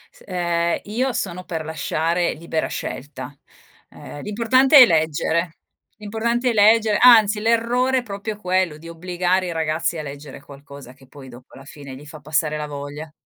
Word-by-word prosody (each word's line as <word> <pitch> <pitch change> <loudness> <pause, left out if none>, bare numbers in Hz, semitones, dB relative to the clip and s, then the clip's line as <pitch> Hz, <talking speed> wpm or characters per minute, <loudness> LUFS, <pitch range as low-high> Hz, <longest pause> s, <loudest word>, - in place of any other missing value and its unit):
S - - -19
ehm, 170 -2 -1
io 245 +6 -1
sono 185 -2 -4
per 160 -3 -5
lasciare 165 +2 -1
libera 160 0 -3
scelta, 140 0 -7 0.5
ehm, 145 - -11
l'importante 255 +7 +3
è 255 - +11
leggere 160 0 0 0.4
l'importante 235 +4 -2
è - - 0
legger 215 0 +4
anzi 220 -4 +6
l'errore 235 +4 +1
è - - -7
proprio 205 0 -6
quello, 185 -5 -1
di 165 +2 -12
obbligare 180 +2 -1
i 175 - -4
ragazzi 160 +1 -2
a 155 - -4
leggere 140 -1 -10
qualcosa 140 -2 -13
che 135 -1 -21
poi 135 -1 -13
dopo 120 +1 -15
alla 135 - -13
fine 140 -2 -11
gli 145 +3 -13
fa 150 +1 -11
passare 150 +1 -1
la 150 0 -5
voglia. 145 +2 -8
170 Hz, 165 wpm, -21 LUFS, 150-210 Hz, 0.5 s, è